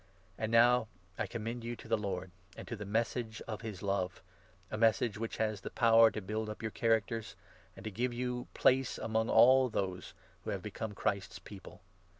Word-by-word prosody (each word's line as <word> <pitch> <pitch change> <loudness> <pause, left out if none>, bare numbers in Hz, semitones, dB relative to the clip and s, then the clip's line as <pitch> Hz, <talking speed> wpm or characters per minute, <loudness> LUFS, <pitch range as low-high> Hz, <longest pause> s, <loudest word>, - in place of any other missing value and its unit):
And 110 +2 -3
now 120 0 +5 0.3
I - - +1
32 - - -21
commend 115 +1 -4
you 120 +1 -4
to - - -13
the 115 - +3
Lord 95 -4 -4 0.3
and - - -8
to 115 - -4
the 105 -2 -7
Message 115 +1 -1
of 110 -2 -5
his 105 -5 -7
Love 95 -2 -1 0.2
— 90 0 -31
a - - -2
Message 110 -1 +2
which 115 0 -4
has 110 -3 -1
the - - -5
power 115 -1 +6
to 110 - -5
build 110 +2 -3
up 105 - -7
your 110 - -2
characters, 115 0 0 0.4
and - - -10
to 110 - -4
give 120 +5 -1
you 125 +1 -2
your 125 - -7
place 130 0 +3
among 110 0 -1
all 130 +1 +6
those 95 -4 -3 0.3
who - - -5
have 95 - -3
become 105 +1 -5
Christ's 95 -2 -2
People. 95 +1 -12
110 Hz, 205 wpm, -33 LUFS, 100-115 Hz, 0.4 s, power